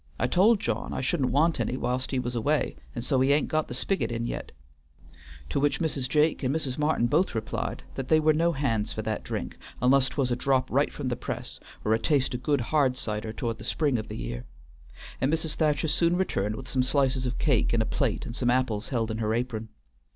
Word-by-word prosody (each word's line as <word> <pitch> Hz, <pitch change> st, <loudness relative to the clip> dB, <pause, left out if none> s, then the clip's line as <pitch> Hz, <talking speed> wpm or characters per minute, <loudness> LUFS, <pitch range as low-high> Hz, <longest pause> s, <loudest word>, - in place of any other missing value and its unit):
I -, -, +1 dB
told 200 Hz, -, +4 dB
John 115 Hz, -, -2 dB
I -, -, -2 dB
shouldn't 130 Hz, 0 st, +1 dB
want 160 Hz, +5 st, +2 dB
any 130 Hz, -, -1 dB
whilst 125 Hz, +1 st, -1 dB
he 135 Hz, -, -1 dB
was 125 Hz, -1 st, -2 dB
away, 145 Hz, +6 st, 0 dB, 0.2 s
and 120 Hz, -1 st, -4 dB
so 130 Hz, 0 st, +2 dB
he 135 Hz, +2 st, +4 dB
ain't 145 Hz, +1 st, +2 dB
got 155 Hz, 0 st, 0 dB
the 125 Hz, -, -5 dB
spiggit 190 Hz, +2 st, 0 dB
in 115 Hz, 0 st, -2 dB
yet," -, -, -5 dB, 1.0 s
to -, -, 0 dB
which 145 Hz, +1 st, +1 dB
Mrs. 145 Hz, -6 st, -1 dB
Jake 150 Hz, +2 st, +2 dB
and 135 Hz, +1 st, 0 dB
Mrs. 145 Hz, -4 st, -1 dB
Martin 150 Hz, -5 st, +2 dB
both 150 Hz, +4 st, +2 dB
replied 110 Hz, -1 st, -3 dB
that 135 Hz, -, -4 dB
they 155 Hz, -, +5 dB
were 155 Hz, 0 st, +4 dB
no 165 Hz, +2 st, +2 dB
hands 115 Hz, -7 st, 0 dB
for 110 Hz, -, -4 dB
that 110 Hz, 0 st, -2 dB
drink, -, -, -5 dB, 0.2 s
unless 130 Hz, +1 st, +4 dB
't -, -, -12 dB
was 130 Hz, -3 st, +1 dB
a -, -, +2 dB
drop 130 Hz, +1 st, +1 dB
right -, -, +2 dB
from -, -, -4 dB
the -, -, -1 dB
press, -, -, -6 dB, 0.3 s
or 110 Hz, -, +3 dB
a 110 Hz, -, +2 dB
taste 135 Hz, +1 st, +1 dB
o' 125 Hz, -, -2 dB
good 140 Hz, +1 st, +1 dB
hard 130 Hz, 0 st, +2 dB
cider 110 Hz, -3 st, -3 dB
towards 115 Hz, 0 st, -3 dB
the -, -, -8 dB
spring 145 Hz, -7 st, +1 dB
of 110 Hz, -, -6 dB
the -, -, -6 dB
year; -, -, -5 dB, 0.8 s
and 135 Hz, +3 st, +2 dB
Mrs. 160 Hz, -1 st, 0 dB
Thacher 150 Hz, -1 st, +1 dB
soon 170 Hz, +3 st, +2 dB
returned 110 Hz, -, 0 dB
with 130 Hz, +2 st, -8 dB
some 130 Hz, -, +1 dB
slices 130 Hz, -1 st, +1 dB
of 125 Hz, -, -3 dB
cake 135 Hz, -7 st, +2 dB
in 115 Hz, -, +2 dB
a 110 Hz, -, +2 dB
plate -, -, -1 dB
and 115 Hz, -, -6 dB
some 125 Hz, -1 st, +1 dB
apples 120 Hz, -3 st, +1 dB
held 115 Hz, -4 st, -1 dB
in 110 Hz, -, -3 dB
her 110 Hz, 0 st, 0 dB
apron. 115 Hz, -2 st, -3 dB
130 Hz, 235 wpm, -27 LUFS, 115-150 Hz, 1.0 s, they